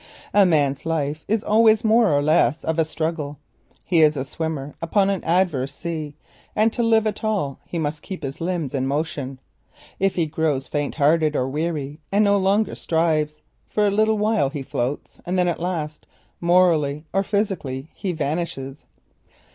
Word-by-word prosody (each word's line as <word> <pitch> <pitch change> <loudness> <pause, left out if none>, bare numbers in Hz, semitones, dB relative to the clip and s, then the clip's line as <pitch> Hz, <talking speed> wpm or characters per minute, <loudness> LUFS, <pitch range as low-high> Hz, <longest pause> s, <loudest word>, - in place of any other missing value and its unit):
A 205 -2 +6
man's 145 -5 +1
life 155 -2 -2
is 220 +1 0
always 220 +1 +4
more 225 -2 +4
or 145 0 +2
less 155 -2 +2
a 160 0 +2
struggle; 155 -2 -3 0.5
he 170 -3 +3
is 155 -1 +4
a 130 - -2
swimmer 150 -1 -4
upon 195 +4 +2
an 195 - -2
adverse 165 -6 +1
sea, 155 -4 -5 0.4
and 220 +1 +3
to 240 - -1
live 225 -1 +3
at 215 0 -2
all 200 -11 -1
he 175 - -4
must 150 -1 -2
keep 185 -2 -7
his 135 +4 -5
limbs 170 -6 -2
in 135 -1 0
motion. 140 -2 -3 0.6
If 195 0 +1
he 170 - +1
grows 150 -3 -1
faint 145 -1 -2
hearted 155 0 +3
or 130 - +1
weary 150 0 -3
and 205 +2 +4
no 200 0 +4
longer 200 +3 +2
strives, 155 -2 0 0.3
for 210 - +1
a 200 - +3
little 215 +1 +2
while 210 -8 +2
he 140 -1 -5
floats, 130 +2 -4
and 180 +2 -2
then 180 -1 +3
at 175 - -1
last, 165 -4 -4 0.3
morally 165 -4 +3
or 195 - +3
physically, 185 -10 -2
he 190 - -3
vanishes. 150 -3 -3
160 Hz, 170 wpm, -23 LUFS, 145-195 Hz, 0.6 s, A